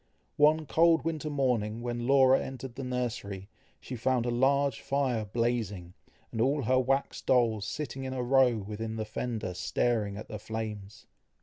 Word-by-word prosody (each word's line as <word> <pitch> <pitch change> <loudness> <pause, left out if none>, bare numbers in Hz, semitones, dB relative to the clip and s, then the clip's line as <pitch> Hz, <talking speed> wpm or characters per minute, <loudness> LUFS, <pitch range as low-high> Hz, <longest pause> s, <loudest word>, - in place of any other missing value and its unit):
One 155 +2 +4
cold 165 +2 +4
winter 155 -2 -2
morning 120 -6 0
when 120 0 -3
Laura 135 -1 +5
entered 130 -1 -7
the 135 - -6
nursery, 120 -6 -4 0.3
she 130 - -7
found 125 +1 +1
a 120 - 0
large 135 0 +2
fire 130 -6 0
blazing, 105 -5 -2 0.4
and 115 - -2
all 140 +3 +2
her 130 +3 +3
wax 135 +2 0
dolls 115 -5 +2
sitting 135 -3 -4
in 130 0 -4
a 125 - -2
row 125 -2 +4
within 110 +2 -5
the 110 -1 -3
fender 110 -3 -4
staring 105 +1 0
at 110 - -8
the 105 - -6
flames. 110 -2 -6
120 Hz, 165 wpm, -29 LUFS, 110-135 Hz, 0.4 s, Laura